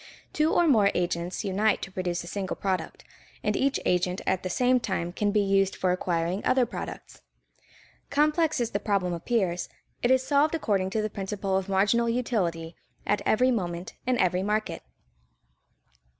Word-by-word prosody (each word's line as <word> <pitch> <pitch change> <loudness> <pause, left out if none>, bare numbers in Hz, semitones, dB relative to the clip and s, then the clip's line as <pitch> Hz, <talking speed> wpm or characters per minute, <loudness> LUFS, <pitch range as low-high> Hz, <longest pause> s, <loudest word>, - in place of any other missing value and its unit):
Two 305 +1 +2
or 345 - +3
more 215 -9 +5
agents 175 0 -2
unite 205 +2 +2
to 195 - -6
produce 180 -2 -2
a - - -10
single 190 +1 -3
product, 190 -2 -3 0.4
and - - 0
each 275 0 +1
agent 180 +1 +1
at 190 -1 +1
the 185 - -4
same 250 +6 +3
time 175 -6 -3
can 205 +2 0
be 210 0 +3
used 195 -1 +2
for 185 - 0
acquiring 180 +1 -1
other 255 -1 +3
products. 235 - -8 0.9
Complex 305 +1 +2
as 235 -2 -1
the 200 - -1
problem 195 -4 0
appears, 180 -1 -1 0.3
it 240 - +2
is 260 0 +3
solved 295 +3 +3
according 200 -11 0
to 215 +2 -1
the 215 - -1
principle 195 0 -3
of 190 0 -1
marginal 205 +5 +2
utility 180 -9 -1 0.3
at 205 - +1
every 255 +4 +3
moment 175 -6 -3
in 255 -1 +2
every 185 -2 +2
market. 210 +2 -1
200 Hz, 165 wpm, -27 LUFS, 180-240 Hz, 0.9 s, more